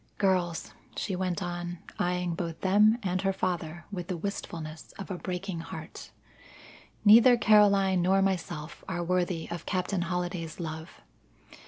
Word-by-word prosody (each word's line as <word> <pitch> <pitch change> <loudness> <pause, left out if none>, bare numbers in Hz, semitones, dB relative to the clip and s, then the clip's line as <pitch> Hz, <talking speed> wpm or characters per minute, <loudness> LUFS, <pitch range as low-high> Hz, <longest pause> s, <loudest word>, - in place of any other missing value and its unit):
Girls," 180 -4 0 0.2
she 195 - -2
went 185 +1 -1
on, 175 0 -4 0.2
eyeing 180 -1 0
both 165 -1 -4
them 210 +4 +5
and 185 -1 0
her 195 0 +2
father 175 -3 -3
with 180 -3 -5
the 185 -3 -3
wistfulness 165 -4 -6
of 195 - -7
a 185 - -3
breaking 185 -1 -4
heart, 165 - -8 1.0
"neither 235 +4 +8
Caroline 200 -4 +5
nor 190 +2 +3
myself 170 -5 -3
are 175 -2 -2
worthy 175 -1 0
of 170 - -6
Captain 185 0 -1
Holliday's 175 -2 -3
love. 160 -1 -6
180 Hz, 140 wpm, -29 LUFS, 170-195 Hz, 1.0 s, neither